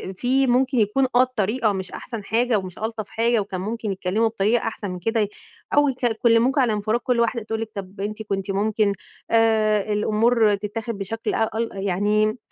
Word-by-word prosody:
في 260 +6 +1
ممكن 255 +1 +2
يكون 220 +6 +2
آه 245 - +7
الطريقة 235 -2 +1
مش 190 -1 -5
أحسن 230 -4 -7
حاجة 230 +2 +1
ومش 185 -2 -8
ألطَف 220 -1 -4
حاجة، 230 +1 +1
وكان 195 -3 -4
ممكن 215 +1 -3
يتكلَّموا 195 +4 0
بطريقة 225 +1 +1
أحسن 210 -3 -4
من 180 - -6
كده، 225 +6 0
ي 205 - 0 0.4
أو 290 0 +4
يك 260 -1 -6
يكلِّموكِ 235 +3 +3
على 245 -5 +3
انفِراد، 215 +3 0
كل 245 -1 0
واحدة 235 0 +1
تقول 220 +1 -3
لِك 220 -1 -5
طب 195 0 -7
أنتِ 210 +2 -4
كنتِ 195 -1 -3
ممكن 205 +1 +1 0.4
آآ، 215 -2 +3
الأمور 215 +1 +3
تتاخد 220 +2 -5
بشكل 215 +3 -3
أ 220 - +1
أل 230 0 -1
يعني 205 +3 +1
220 Hz, 185 wpm, -23 LUFS, 205-235 Hz, 0.4 s, آه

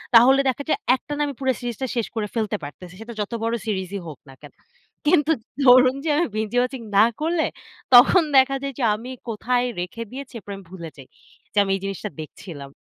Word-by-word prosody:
তাহলে 260 +4 +7
দেখা 265 +2 -2
যায়, - - +2 0.2
একটানা 290 +2 -5
আমি 285 - -4
পুরো 265 -1 +1
সিরিজটা 245 +1 -4
শেষ 235 -3 0
করে 215 -2 -1
ফেলতে 215 -2 -1
পারতেছি। 175 +5 -9
সেটা 235 +1 -8
যত 205 - -4
বড় 230 +1 0
সিরিজই 195 -2 -3
হোক 150 -4 -9
না - - -12
কেন। 145 - -12 0.6
কিন্তু 300 -1 +4 0.3
ধরুন 255 +1 +7
যে, - - 0
আমি 345 - +2
বিঞ্জ 215 -1 -2
ওয়াচিং 250 0 -1 0.2
না 210 - +8 0.2
করলে, 325 0 +1 0.5
তখন 330 +9 +8
দেখা 265 +1 +5
যায় 275 0 -4
যে, - - -1
আমি 240 +4 -8 0.2
কোথায় 245 +3 0 0.2
রেখে 190 +6 -5
দিয়েছি, 270 +1 -8
এরপর 205 -2 -10
আমি 195 - -12
ভুলে 170 -3 -7
যাই। 135 -2 -12 0.5
যে - - -8
আমি 195 - -2
এই 195 - -5
জিনিসটা 195 -1 -4
দেখছিলাম। 150 -2 -9
230 Hz, 200 wpm, -23 LUFS, 195-265 Hz, 0.6 s, না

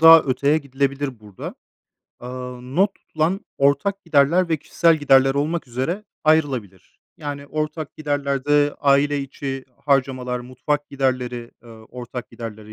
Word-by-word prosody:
daha 165 0 +10
öteye 140 +3 +2
gidilebilir 140 -2 -2
burada. 105 -3 -8 0.7
Aaa, 125 0 -7
not 180 +11 +1
tutulan 165 +6 -1 0.2
ortak 185 +9 +2
giderler 165 +3 +3
ve 160 - +2
kişisel 165 +3 +3
giderler 135 -2 +4
olmak 155 +2 -1
üzere 165 - -2 0.2
ayrılabilir. 135 - 0 0.2
Yani, 145 -1 -6
ortak 155 +1 -4
giderlerde 145 0 +1
aile 145 0 +3
içi 135 -1 -5 0.2
harcamalar, 130 -3 +1
mutfak 130 +4 -2
giderleri, 125 -3 -1
eee, 120 - -16
ortak 120 +2 -9
giderlere 110 -2 -8
140 Hz, 125 wpm, -22 LUFS, 125-150 Hz, 0.7 s, daha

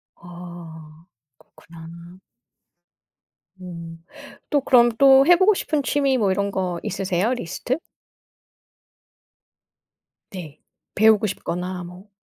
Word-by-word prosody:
아. 170 -2 -12 0.3
그렇구나. 170 +2 -14 1.4
음 170 -2 -10 0.5
또 290 -2 +1
그럼 240 -3 +5
또 270 0 +6
해 355 - +8
보고 380 +4 +4
싶은 305 -6 -2
취미 275 -2 +1
뭐 200 -4 +1
이런 200 +1 -1
거 180 -3 -3
있으세요, 190 +5 -1
리스트? 245 - -4 2.5
네. 155 -6 -9 0.4
배우고 215 0 +4
싶거나 180 -1 -5
뭐. 180 +4 -13
185 Hz, 175 characters per minute, -22 LUFS, 170-245 Hz, 2.5 s, 해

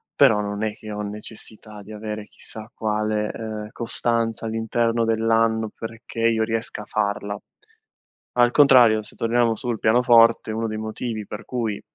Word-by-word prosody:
però 125 -7 +5
non 105 +1 -3
è 110 -1 -1
che 110 0 -10
ho 105 0 -4
necessità 105 0 -8
di 105 - -12
avere 105 0 -6
chissà 110 +1 -7
quale, 105 0 -1
ehm, 110 -1 -6
costanza 115 -1 0
all'interno 115 +1 0
dell'anno 115 0 +2
perché 115 +1 -7
io 115 -1 +3
riesca 115 -1 -3
a - - -14
farla. 100 -1 -2 1.0
Al 120 0 +4
contrario, 125 -6 +6
se - - -9
torniamo 115 0 +2
sul 120 0 -3
pianoforte, 115 -1 +4
uno 115 +1 -2
dei 110 -1 -4
motivi 110 0 -4
per 105 +2 -8
cui 115 -4 -3
110 Hz, 150 wpm, -23 LUFS, 105-115 Hz, 1.0 s, contrario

